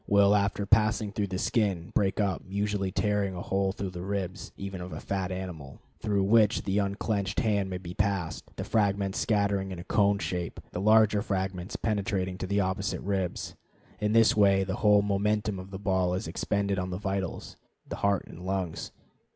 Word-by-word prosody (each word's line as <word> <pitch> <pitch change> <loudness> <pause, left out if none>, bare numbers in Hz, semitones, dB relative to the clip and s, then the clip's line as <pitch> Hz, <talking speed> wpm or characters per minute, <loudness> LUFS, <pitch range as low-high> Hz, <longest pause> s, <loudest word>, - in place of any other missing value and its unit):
will, 100 0 +5
after 100 0 +1
passing 110 0 +3
through 100 0 -1
the 95 -1 -3
skin, 95 -6 0
break 95 0 +1
up, 100 -3 0
usually 100 -1 -1
tearing 100 -1 0
a 90 - -5
hole 95 0 0
through 95 -1 -4
the 90 -1 -6
ribs, 95 0 -4
even 95 -2 -5
of 90 +1 -7
a - - -5
fat 95 -1 -2
animal, 90 -7 -6 0.2
through 100 -3 +1
which 105 +1 +4
the 100 +1 +1
unclenched 100 0 -1
hand 100 -4 +1
can 90 - -3
be 85 0 -6
passed, 100 -4 -1
the - - -4
fragments 100 -2 +1
scattering 100 -2 +1
in 90 - -5
a 85 - -7
cone 100 +1 +3
shape, 90 -3 -3
the 90 - -3
larger 110 0 +5
fragments 95 -1 -3
penetrating 95 -4 -1
to 95 0 -5
the 100 +2 +1
opposite 95 +1 -1
ribs. 95 -3 -2 0.5
In 105 0 0
this 115 -1 +5
way 100 -2 +5
the 95 +2 -3
whole 105 -2 +5
momentum 105 0 0
of 95 +1 -9
the 95 - -6
ball 95 -2 +1
is 95 - -3
expended 100 -2 -1
on 90 0 -2
the 90 - -3
vitals, 95 -1 -3 0.3
the - - -5
heart 100 -1 +1
and 90 - -11
lungs. 95 -3 -3
100 Hz, 190 wpm, -28 LUFS, 95-105 Hz, 0.5 s, will